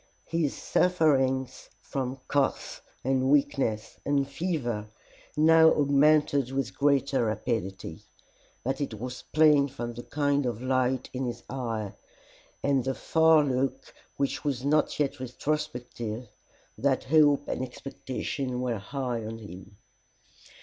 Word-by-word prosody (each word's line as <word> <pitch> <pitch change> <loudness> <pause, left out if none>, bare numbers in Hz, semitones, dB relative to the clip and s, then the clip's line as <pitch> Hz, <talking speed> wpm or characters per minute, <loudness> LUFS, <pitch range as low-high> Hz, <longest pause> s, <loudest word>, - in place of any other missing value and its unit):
His 165 -4 -1
sufferings 135 -7 +1
from 130 -1 -4
cough 140 -2 -1 0.2
and 130 0 +1
weakness 135 -6 +1
and 140 -1 +1
fever 140 - -2 0.5
now 160 +1 +7
augmented 145 -1 +3
with 135 0 -3
greater 140 -3 +2
rapidity, 95 -6 -3 0.6
but 135 +3 -2
it 135 -6 -3
was 125 +3 -7
plain 150 -3 +5
from 120 -3 -6
the 120 - -7
kind 145 0 0
of 120 -3 -3
light 130 0 0
in 130 0 -2
his 120 0 -6
eye, 115 -6 -3 0.7
and 140 -2 +2
the 135 +1 -2
far 160 -1 +4
look 135 -1 -2 0.2
which 140 0 -1
was 135 -3 -2
not 150 +1 +2
yet 145 -1 0
retrospective, 125 -3 -4 0.5
that 135 -1 +1
hope 145 0 +4
and - - -2
expectation 130 0 -4
were 120 -4 -1
high 125 +3 -3
in 110 0 -6
him. 100 -1 -11
135 Hz, 120 wpm, -28 LUFS, 120-145 Hz, 0.7 s, now